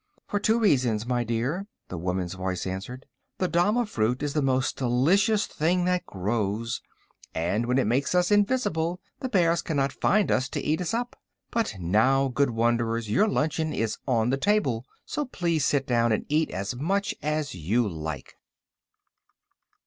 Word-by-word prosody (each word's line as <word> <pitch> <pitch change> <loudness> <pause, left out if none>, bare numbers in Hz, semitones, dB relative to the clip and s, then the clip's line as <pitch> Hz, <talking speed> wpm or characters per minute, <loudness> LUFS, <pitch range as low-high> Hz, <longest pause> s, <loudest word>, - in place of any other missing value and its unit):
"For 205 - -1
two 220 +2 +2
reasons, 125 - +2
my 120 -1 0
dear," 125 - -2 0.2
the 90 - -5
woman's 90 +1 -2
voice 95 -1 -3
answered. 100 +8 -5 0.3
"The 185 - 0
dama 205 +8 +2
fruit 125 - -1
is 145 -1 -1
the 150 - +1
most 130 -1 +1
delicious 175 - +2
thing 175 +3 0
that 180 0 0
grows, 105 +3 -2 0.5
and 100 +8 0
when 125 +1 +2
it 135 - +3
makes 130 +10 +1
us 180 +2 +3
invisible 200 -6 +1 0.2
the 260 - -3
bears 170 -5 +3
cannot 140 -4 -1
find 210 0 +2
us 130 +1 +1
to - - -3
eat 155 +4 0
us 180 +6 -1
up. 245 +1 -4 0.3
But 225 - -1
now, 120 +10 +3
good 140 +2 +1
wanderers, 115 -1 0
your 165 - +4
luncheon 160 -4 0
is 110 -1 -2
on 120 -2 +2
the 135 - +1
table, 135 - +1 0.2
so 300 - -2
please 170 - 0
sit 140 -2 +1
down 120 -2 +2
and 110 - 0
eat 155 +2 +2
as 100 +5 -3
much 195 +10 0
as 150 -2 -1
you 105 +8 0
like." 80 -4 -6
135 Hz, 165 wpm, -26 LUFS, 115-175 Hz, 0.5 s, your